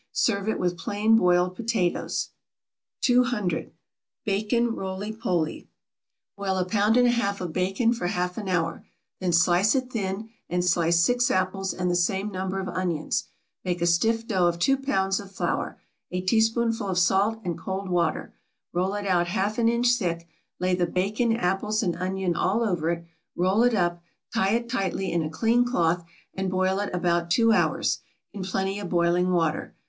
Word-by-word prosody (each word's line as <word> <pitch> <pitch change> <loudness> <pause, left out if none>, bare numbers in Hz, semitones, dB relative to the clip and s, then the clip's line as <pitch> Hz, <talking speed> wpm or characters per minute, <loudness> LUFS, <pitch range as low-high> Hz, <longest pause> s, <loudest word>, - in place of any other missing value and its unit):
Serve 200 +1 +1
it - - -1
with 180 -1 -1
plain 210 +5 +2
boiled 180 -3 +3
potatoes. 220 -6 -1 0.7
200. 245 -9 +1 0.5
=Bacon 220 +3 +1
Roly 195 +1 -4
Poly.= 180 -8 -2 0.7
Boil 195 -1 -2
a 185 - +1
pound 210 +4 +2
and 245 0 +5
a - - +4
half 200 -4 0
of 175 -3 -5
bacon 195 +6 +1
for 205 -7 -3
half 180 -1 -1
an 205 -3 -5
hour; 165 -2 -1 0.4
then 185 -2 0
slice 175 +6 +4
it 255 -1 -1
thin; 195 -2 -2
peel 225 - -18 0.2
and 180 +1 0
slice 170 -1 +3
six 245 0 +2
apples 190 +1 0
and 180 -1 -1
the - - +1
same 190 +4 0
number 190 0 -3
of 190 - -4
onions; 175 -5 -2 0.4
make 180 -1 -2
a 170 - +1
stiff 225 +7 +2
dough 190 -6 +2
of 170 0 0
two 270 +11 +3
pounds 195 -8 0
of 200 -1 -10
flour, 195 - -2 0.3
a 180 - -2
teaspoonful 225 +2 +1
of 185 -2 -1
salt, 195 +5 +2
and 170 -1 -3
cold 190 +3 -4
water; 175 -1 -1 0.4
roll 185 +3 0
it 205 -1 -4
out 175 -3 +2
half 205 +4 -1
an 230 -1 +4
inch 235 +1 +1
thick; 175 -8 0 0.3
lay 185 0 +1
the 180 -1 +1
bacon, 210 +6 0
apples, 210 +2 0
and 175 -4 0
onion 185 -1 -1
all 220 +5 +1
over 175 -7 0
it, 170 0 -2 0.3
roll 185 +5 +2
it 245 -1 +4
up, 175 -3 0 0.3
tie 195 +2 +2
it 235 0 -2
tightly 195 -5 -2
in 170 - +1
a 155 - -2
clean 225 +9 +2
cloth, 175 -8 +1 0.3
and 190 0 -2
boil 185 +1 +1
it 205 - -2
about 175 -1 0
two 230 +6 +4
hours, - - +1 0.3
in 200 - -6
plenty 190 +1 -2
of 200 -4 -5
boiling 175 +1 +2
water. 165 -3 0
190 Hz, 180 wpm, -26 LUFS, 175-220 Hz, 0.7 s, and